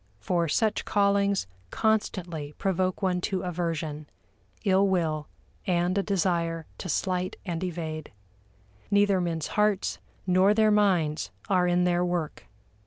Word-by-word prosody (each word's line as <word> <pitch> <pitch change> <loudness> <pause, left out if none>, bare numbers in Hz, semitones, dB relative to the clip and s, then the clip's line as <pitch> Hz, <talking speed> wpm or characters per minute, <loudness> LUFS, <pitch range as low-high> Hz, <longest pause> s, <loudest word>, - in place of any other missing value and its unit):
For 170 +10 0
such 215 +7 +1
callings 200 - +2 0.2
constantly 175 - -1
provoke 185 0 0
one 180 -1 +1
to 190 0 -2
aversion, 165 -4 -3 0.6
ill 195 0 +4
will, 160 -5 0 0.4
and 175 0 +1
a 200 - +2
desire 170 -4 0
to 185 - -5
slight 185 +3 -1
and 175 -2 -3
evade. 160 -3 -4 0.8
Neither 200 -2 +3
men's 165 -3 -2
hearts 210 -2 +1 0.3
nor 185 +3 +4
their 215 -1 +4
minds 180 -7 +2 0.2
are 180 -2 +3
in 175 0 +3
their 175 0 +2
work. 175 -3 -3
180 Hz, 125 wpm, -27 LUFS, 165-195 Hz, 0.8 s, ill